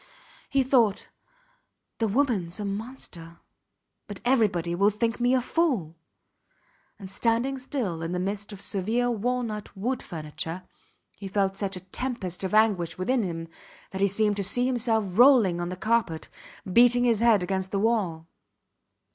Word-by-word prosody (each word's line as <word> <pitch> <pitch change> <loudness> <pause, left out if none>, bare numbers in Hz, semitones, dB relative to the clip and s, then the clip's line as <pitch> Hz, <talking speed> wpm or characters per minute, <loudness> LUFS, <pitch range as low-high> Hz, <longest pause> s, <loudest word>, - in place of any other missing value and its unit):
He 275 -1 +2
thought: 240 -6 +2 0.9
The 225 - +2
womans 210 -7 0
a 205 - -3
monster, 195 -6 -7 0.7
but 205 -2 -7
everybody 205 -9 +2
will 200 +4 +4
think 230 +3 -1
me 245 +2 +3
a 255 - +2
fool; 245 - 0 1.0
and 195 - -9
standing 235 +7 0
still 240 - -3
in 165 +1 -3
the 180 - -1
midst 200 +3 -3
of 200 -1 -9
severe 225 +7 0
walnut 230 -2 -3
wood 245 +6 -2
furniture, 160 +2 -6 0.5
he 195 - -7
felt 195 0 0
such 195 -1 -3
a - - -9
tempest 190 -2 -4
of 190 +2 -1
anguish 205 -6 +2
within 240 +7 +1
him 165 -4 -4 0.4
that 190 0 -5
he 200 - +5
seemed 205 +1 +1
to 200 - -1
see 245 +6 +1
himself 235 -4 +1
rolling 235 -10 +6
on 175 - -3
the 180 - -5
carpet, 215 -6 0 0.4
beating 245 +2 +6
his 235 -3 +3
head 225 -5 +4
against 190 +1 -2
the 200 - -2
wall. 195 -7 0
210 Hz, 155 wpm, -26 LUFS, 185-240 Hz, 1.0 s, rolling